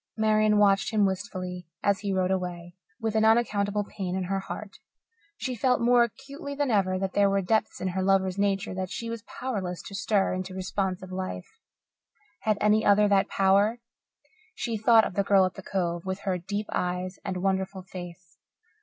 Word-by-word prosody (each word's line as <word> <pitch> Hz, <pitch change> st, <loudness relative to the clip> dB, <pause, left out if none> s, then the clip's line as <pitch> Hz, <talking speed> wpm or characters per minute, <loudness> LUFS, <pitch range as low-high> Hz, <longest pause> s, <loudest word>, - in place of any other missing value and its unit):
Marian 215 Hz, -1 st, +3 dB
watched 200 Hz, 0 st, +3 dB
him 210 Hz, -2 st, +3 dB
wistfully 185 Hz, -2 st, -4 dB, 0.2 s
as 200 Hz, -1 st, +2 dB
he 200 Hz, -1 st, -3 dB
rode 185 Hz, -1 st, +1 dB
away, 175 Hz, -2 st, -3 dB, 0.3 s
with 225 Hz, -1 st, -1 dB
an 220 Hz, 0 st, +2 dB
unaccountable 210 Hz, -2 st, +2 dB
pain 190 Hz, -3 st, -5 dB
in 190 Hz, -, -1 dB
her 195 Hz, +2 st, -1 dB
heart. 200 Hz, +1 st, -8 dB, 0.6 s
She 255 Hz, -, -3 dB
felt 250 Hz, +2 st, +2 dB
more 240 Hz, +1 st, +4 dB
acutely 280 Hz, +5 st, -6 dB
than 285 Hz, -3 st, 0 dB
ever 190 Hz, -3 st, +2 dB
that 190 Hz, 0 st, -3 dB
there 200 Hz, -1 st, +4 dB
were 195 Hz, 0 st, +1 dB
depths 220 Hz, +4 st, 0 dB
in 185 Hz, -, -1 dB
her 190 Hz, +1 st, -2 dB
lover's 190 Hz, -1 st, +2 dB
nature 200 Hz, 0 st, 0 dB
that 185 Hz, 0 st, -3 dB
she 230 Hz, +3 st, -5 dB
was 230 Hz, -1 st, -5 dB
powerless 205 Hz, -7 st, -4 dB
to -, -, -10 dB
stir 200 Hz, -1 st, +1 dB
into 185 Hz, 0 st, -4 dB
responsive 190 Hz, -1 st, -3 dB
life. 185 Hz, -, -6 dB, 0.8 s
Had 215 Hz, -1 st, +1 dB
any 210 Hz, +1 st, +3 dB
other 205 Hz, +1 st, +5 dB
that 195 Hz, -1 st, +3 dB
power? 200 Hz, +4 st, +3 dB, 0.8 s
She 230 Hz, -2 st, -2 dB
thought 220 Hz, +1 st, +5 dB
of -, -, -4 dB
the 200 Hz, -, +1 dB
girl 195 Hz, -1 st, +5 dB
at 185 Hz, -, -3 dB
the -, -, -9 dB
Cove, 175 Hz, -4 st, -2 dB
with 190 Hz, +1 st, -4 dB
her 185 Hz, -2 st, -1 dB
deep 205 Hz, +4 st, -3 dB
eyes 180 Hz, +1 st, -2 dB
and 185 Hz, -, -3 dB
wonderful 190 Hz, 0 st, -1 dB
face. 175 Hz, -2 st, -10 dB
195 Hz, 185 wpm, -27 LUFS, 185-215 Hz, 0.8 s, other